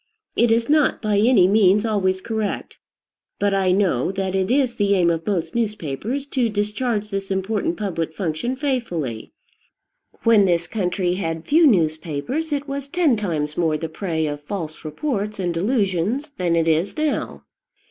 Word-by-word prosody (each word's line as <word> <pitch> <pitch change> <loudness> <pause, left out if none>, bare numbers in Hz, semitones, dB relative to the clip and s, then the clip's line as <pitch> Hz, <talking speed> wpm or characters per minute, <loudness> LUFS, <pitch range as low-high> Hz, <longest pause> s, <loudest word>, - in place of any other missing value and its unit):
It 235 0 +3
is 230 +1 +2
not 300 -1 +3
by 210 -2 +1
any 215 -4 +5
means 205 +1 +4
always 190 -4 0
correct; 220 -2 -3 0.6
but 205 -1 +1
I 190 -2 +2
know 185 -7 +1
that 190 -1 -2
it 190 -1 0
is 260 -1 +2
the 200 -2 +2
aim 175 -2 +3
of 165 -1 -3
most 195 -1 -1
newspapers 220 - -2
to 250 -5 +1
discharge 210 +1 -2
this 195 0 -3
important 190 -1 -1
public 165 -6 -3
function 185 +9 -2
faithfully. 225 - -3 0.9
When 220 -3 +5
this 175 -2 +1
country 180 -1 -1
had 165 -3 -3
few 320 +2 +5
newspapers 165 - 0
it 290 0 -2
was 275 0 -4
ten 315 -4 +2
times 155 -8 -2
more 160 -3 +1
the 160 +1 -5
prey 160 -2 -2
of 145 -1 -4
false 160 -1 -6
reports 210 - -3
and 180 -3 -1
delusions 205 - 0
than 180 -9 0
it 165 -1 +1
is 165 - +1
now. 305 -1 -2
195 Hz, 160 wpm, -22 LUFS, 170-230 Hz, 0.9 s, any